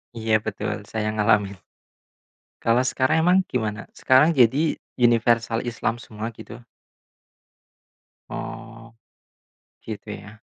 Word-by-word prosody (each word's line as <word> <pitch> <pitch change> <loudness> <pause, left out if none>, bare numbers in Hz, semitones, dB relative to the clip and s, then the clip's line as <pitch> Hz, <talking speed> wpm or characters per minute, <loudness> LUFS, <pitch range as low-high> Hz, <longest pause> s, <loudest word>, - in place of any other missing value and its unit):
Iya 110 -1 +1
betul, 105 -1 -4
saya 110 -1 -2
ngalamin. 105 -2 +2 1.1
Kalau 115 +2 +3
sekarang 130 +5 +1
emang 180 +3 +4
gimana? 110 -4 -3
Sekarang 150 +6 +4
jadi 135 +5 +3 0.2
universal 115 -1 +2
Islam 120 0 -3
semua 110 +2 -7
gitu? 110 - -11 1.7
Oh. - - -8 0.9
Gitu 105 -2 -7
ya. 110 +2 -14
115 Hz, 95 wpm, -23 LUFS, 110-125 Hz, 1.7 s, emang